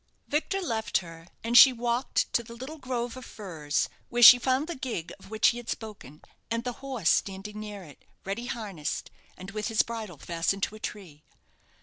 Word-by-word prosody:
Victor 320 +6 -1
left 225 -8 0
her, 165 -2 -9 0.2
and 230 +1 -1
she 265 +2 +11
walked 240 +1 -1
to - - +3
the 235 0 -11
little 275 +6 -8
grove 245 -2 -3
of 255 - -9
firs, 160 -11 -2 0.2
where 240 0 +2
she 245 +2 +12
found 260 +3 +1
the 345 - -4
gig 250 - -5
of 195 - -15
which 220 0 +4
he 240 - -3
had 240 -1 -8
spoken, 200 - -7 0.3
and 230 0 -1
the 250 - -2
horse 255 -11 +1
standing 200 +2 -2
near 210 -2 -7
it, 150 -4 -15 0.2
ready 210 +6 -3
harnessed, 205 - -4 0.3
and 185 +1 -9
with 215 0 -3
his 225 -2 +3
bridle 220 -7 -6
fastened 175 +6 -1
to - - 0
a 215 - -10
tree. 185 -9 -7
220 Hz, 195 wpm, -28 LUFS, 195-245 Hz, 0.3 s, she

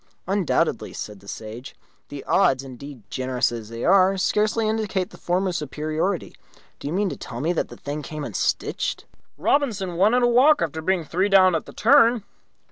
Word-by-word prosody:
"Undoubtedly," 195 -2 0
said 105 -2 -7
the 100 - -18
Sage. 110 +5 -8 0.3
"The 145 -1 -7
odds, 135 -9 +2
indeed, 135 -1 -10
generous 130 -1 0
as 115 -2 -7
they 115 +1 -5
are, 195 +1 +4
scarcely 215 +3 +1
indicate 215 -3 -1
the - - -13
former's 180 0 0
superiority. 155 +5 -3 0.5
Do - - -6
you - - -3
mean 200 +1 +1
to - - -5
tell 120 - -7
me 160 +6 0
that 165 - -1
the - - -12
thing 145 +2 -5
came 150 +1 -6
unstitched?" - - -2 0.3
"Robinson 205 -11 0
won 205 +6 +4
in 250 - +2
a - - +5
walk, 265 +6 +5
after 160 -1 -2
being 185 +1 0
three 185 +6 0
down 190 -2 +6
at 160 - -2
the - - -9
turn. 235 -2 +4
180 Hz, 185 wpm, -23 LUFS, 140-205 Hz, 0.5 s, down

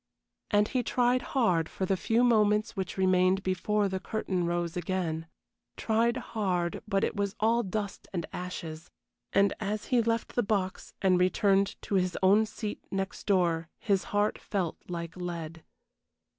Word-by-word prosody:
And 205 0 +3
he 255 - +1
tried 245 +1 +2 0.2
hard 175 -10 +3
for 190 - -3
the 195 - +1
few 225 +6 +2
moments 215 -3 +3
which 190 -1 -4
remained 185 0 +3
before 200 +3 +1
the 190 0 -2
curtain 185 -3 -2
rose 170 -1 -1
again. 175 -2 -2 0.5
Tried 230 +2 +1 0.2
hard, 180 -6 0
but 195 -2 +1
it - - 0
was 200 0 -1
all 230 +2 +3
dust 205 -1 -4
and 170 -4 -2
ashes; 170 -2 -6 0.4
and 200 0 +4
as 210 0 -2
he 245 - +5
left 230 0 -1
the 245 - +2
box 200 -4 -2
and 185 -2 +4
returned 195 +1 +2
to - - -5
his 185 -2 +1
own 205 +4 +5
seat 215 -1 -5
next 195 0 -4
door 170 -4 +2
his 195 -3 0
heart 205 +1 0
felt 185 -5 -2
like 170 -1 -5
lead. 165 -3 -5
195 Hz, 155 wpm, -29 LUFS, 180-215 Hz, 0.5 s, he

